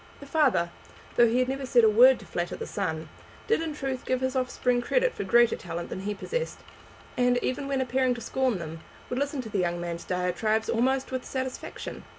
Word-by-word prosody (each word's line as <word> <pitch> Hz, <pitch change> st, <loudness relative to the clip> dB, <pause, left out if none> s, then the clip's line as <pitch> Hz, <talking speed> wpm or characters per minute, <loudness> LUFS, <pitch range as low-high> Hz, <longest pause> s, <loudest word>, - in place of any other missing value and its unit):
The 285 Hz, -, -10 dB
father, 275 Hz, -, +2 dB, 0.4 s
though 240 Hz, -, +6 dB
he 230 Hz, +2 st, +1 dB
had 255 Hz, 0 st, +2 dB
never 270 Hz, +1 st, -3 dB
said 250 Hz, -2 st, +4 dB
a -, -, +7 dB
word 250 Hz, +4 st, +7 dB
to -, -, -12 dB
flatter 175 Hz, 0 st, -3 dB
the -, -, -5 dB
son, 160 Hz, 0 st, -3 dB, 0.4 s
did 455 Hz, -5 st, +2 dB
in 320 Hz, -2 st, -3 dB
truth 270 Hz, -3 st, -3 dB
give 255 Hz, -, 0 dB
his 260 Hz, 0 st, -1 dB
offspring 250 Hz, -1 st, +1 dB
credit -, -, +1 dB
for -, -, -4 dB
greater 235 Hz, +4 st, +4 dB
talent 170 Hz, -1 st, -6 dB
than -, -, -5 dB
he 205 Hz, +2 st, -3 dB
possessed, 485 Hz, -, -3 dB, 0.6 s
and, 245 Hz, 0 st, +3 dB
even 275 Hz, +2 st, -2 dB
when 275 Hz, -1 st, 0 dB
appearing 255 Hz, 0 st, +1 dB
to 235 Hz, -, -8 dB
scorn 260 Hz, -3 st, 0 dB
them, 165 Hz, -1 st, -7 dB, 0.3 s
would 250 Hz, -, -1 dB
listen 285 Hz, -1 st, -1 dB
to 225 Hz, -, -8 dB
the 205 Hz, -2 st, -1 dB
young 175 Hz, -1 st, 0 dB
man's 170 Hz, -1 st, -4 dB
diatribes 185 Hz, +5 st, 0 dB
almost 260 Hz, +3 st, +1 dB
with 260 Hz, -1 st, -2 dB
satisfaction. 260 Hz, -1 st, -5 dB
250 Hz, 210 wpm, -27 LUFS, 200-265 Hz, 0.6 s, a